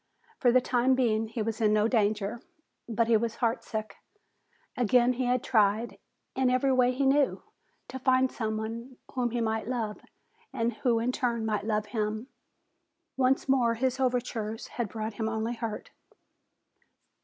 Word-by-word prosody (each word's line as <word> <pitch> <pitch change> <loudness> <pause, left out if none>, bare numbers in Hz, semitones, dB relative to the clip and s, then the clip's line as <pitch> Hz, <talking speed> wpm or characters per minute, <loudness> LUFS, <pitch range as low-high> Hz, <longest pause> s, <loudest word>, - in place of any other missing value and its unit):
For 245 - +4
the 255 +1 +5
time 250 +1 +2
being 225 -4 +1
he 220 0 -3
was 225 0 -3
in 210 -1 +4
no 215 0 +3
danger, 215 -1 0 0.5
but 230 0 +1
he 230 - +4
was 230 +1 -2
heartsick. 225 -2 -2 0.8
Again 245 +1 +3
he 250 +1 -2
had 250 0 +1
tried, 215 0 +1 0.4
in 260 -1 +2
every 255 +2 +2
way 250 -1 +4
he 265 +2 0
knew, 275 +1 +2 0.5
to 260 - -6
find 260 0 +3
someone 225 +3 -4 0.2
whom 250 -2 0
he 240 0 -2
might 220 -1 -1
love 230 -4 -3 0.5
and 235 +1 -1
who 235 +1 +1
in 235 +2 0
turn 235 -3 -1
might 210 -2 -1
love 210 -1 0
him. 215 +3 -3 0.9
Once 265 +1 +2
more 245 -4 +3
his 260 +2 -1
overtures 240 -4 -2
had 235 -4 -3
brought 220 +1 -4
him 220 +1 -2
only 225 +1 -2
hurt. 225 -2 -5
235 Hz, 155 wpm, -28 LUFS, 220-255 Hz, 0.9 s, the